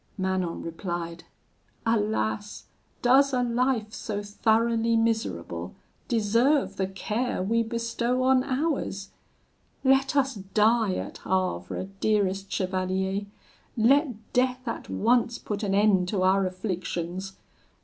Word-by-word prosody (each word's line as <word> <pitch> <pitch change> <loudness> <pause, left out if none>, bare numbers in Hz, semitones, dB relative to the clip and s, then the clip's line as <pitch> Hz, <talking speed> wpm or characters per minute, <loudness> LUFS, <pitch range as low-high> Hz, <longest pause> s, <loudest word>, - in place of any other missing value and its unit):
"Manon 185 -2 -1
replied: 170 0 -5 0.6
'Alas! 215 -1 -1 0.4
does 270 +3 +5
a 250 -1 +2
life 240 -2 0
so 205 -2 -4
thoroughly 230 +2 +2
miserable 90 - -2 0.3
deserve 230 +1 +2
the 190 - 0
care 210 +3 -2
we 230 +4 +2
bestow 235 +2 -1
on 260 0 +4
ours? 265 -8 -2 0.7
Let 270 +1 +3
us 270 -1 +2
die 210 +1 +2
at - - -5
Havre, 185 - -2
dearest 195 -2 0
chevalier! 190 +1 -1 0.5
Let 240 -1 +2
death 255 +1 +1
at - - -4
once 240 +1 +2
put 210 0 -4
an 195 -2 0
end 200 -3 +4
to 185 -1 0
our 190 +1 +3
afflictions! 185 0 -4
215 Hz, 110 wpm, -27 LUFS, 190-240 Hz, 0.7 s, does